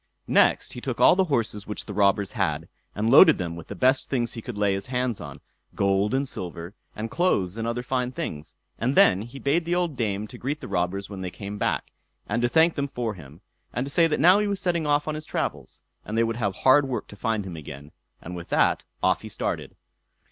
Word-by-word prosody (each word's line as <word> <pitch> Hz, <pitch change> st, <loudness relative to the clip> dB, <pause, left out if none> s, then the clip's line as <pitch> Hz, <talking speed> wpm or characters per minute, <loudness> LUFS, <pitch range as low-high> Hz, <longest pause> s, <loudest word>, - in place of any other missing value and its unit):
Next -, -, +3 dB
he -, -, -7 dB
took -, -, -4 dB
all -, -, +7 dB
the 190 Hz, 0 st, +3 dB
horses 115 Hz, -, -1 dB
which 105 Hz, -, -5 dB
the -, -, -7 dB
robbers 100 Hz, -1 st, +2 dB
had, 85 Hz, -8 st, -1 dB, 0.3 s
and 105 Hz, +2 st, -1 dB
loaded 160 Hz, -5 st, +8 dB
them 85 Hz, -2 st, -4 dB
with 85 Hz, -1 st, -10 dB
the -, -, -7 dB
best 130 Hz, +1 st, +2 dB
things 120 Hz, -4 st, -1 dB
he 115 Hz, -, -6 dB
could 115 Hz, -1 st, -7 dB
lay 100 Hz, -1 st, +2 dB
his 95 Hz, 0 st, -4 dB
hands 125 Hz, -3 st, -1 dB
on -, -, -9 dB, 0.3 s
gold 100 Hz, +4 st, +1 dB
and 135 Hz, +1 st, 0 dB
silver, 85 Hz, -4 st, -6 dB, 0.2 s
and 110 Hz, +1 st, -5 dB
clothes 100 Hz, -, +1 dB
and 115 Hz, 0 st, -3 dB
other 120 Hz, +1 st, -2 dB
fine 125 Hz, 0 st, -1 dB
things; 75 Hz, -, -6 dB, 0.2 s
and 125 Hz, +4 st, 0 dB
then 185 Hz, -, +5 dB
he 120 Hz, +5 st, -9 dB
bade 145 Hz, +5 st, +1 dB
the 170 Hz, +1 st, -1 dB
old 175 Hz, -4 st, 0 dB
dame 105 Hz, -4 st, -1 dB
to 125 Hz, -, -11 dB
greet 145 Hz, +4 st, -3 dB
the -, -, -8 dB
robbers 95 Hz, +1 st, -1 dB
when 95 Hz, -2 st, -8 dB
they 90 Hz, -, -3 dB
came 100 Hz, +3 st, -7 dB
back, -, -, -1 dB, 0.4 s
and 115 Hz, -, -1 dB
to 120 Hz, -, +2 dB
thank 160 Hz, +4 st, +4 dB
them 140 Hz, -1 st, -2 dB
for 120 Hz, -5 st, -3 dB
him, 80 Hz, -2 st, -13 dB, 0.3 s
and 125 Hz, -, -1 dB
to 140 Hz, -, -6 dB
say 165 Hz, +2 st, +4 dB
that 150 Hz, -, -1 dB
now 180 Hz, +6 st, +6 dB
he 210 Hz, -, 0 dB
was 200 Hz, -1 st, -1 dB
setting 170 Hz, -4 st, 0 dB
off 145 Hz, +1 st, +2 dB
on 155 Hz, -, -1 dB
his 155 Hz, 0 st, -5 dB
travels, -, -, -4 dB, 0.2 s
and 110 Hz, -, -4 dB
they 115 Hz, -, +4 dB
would 115 Hz, 0 st, -1 dB
have 100 Hz, -5 st, -1 dB
hard 135 Hz, +5 st, +4 dB
work 130 Hz, -, -3 dB
to -, -, -12 dB
find 110 Hz, -1 st, -1 dB
him 90 Hz, -3 st, -6 dB
again; 75 Hz, -1 st, -9 dB, 0.3 s
and 90 Hz, +2 st, -7 dB
with 85 Hz, -1 st, -8 dB
that, -, -, +3 dB, 0.2 s
off -, -, +2 dB
he -, -, -8 dB
started. -, -, -4 dB
115 Hz, 240 wpm, -25 LUFS, 100-140 Hz, 0.4 s, loaded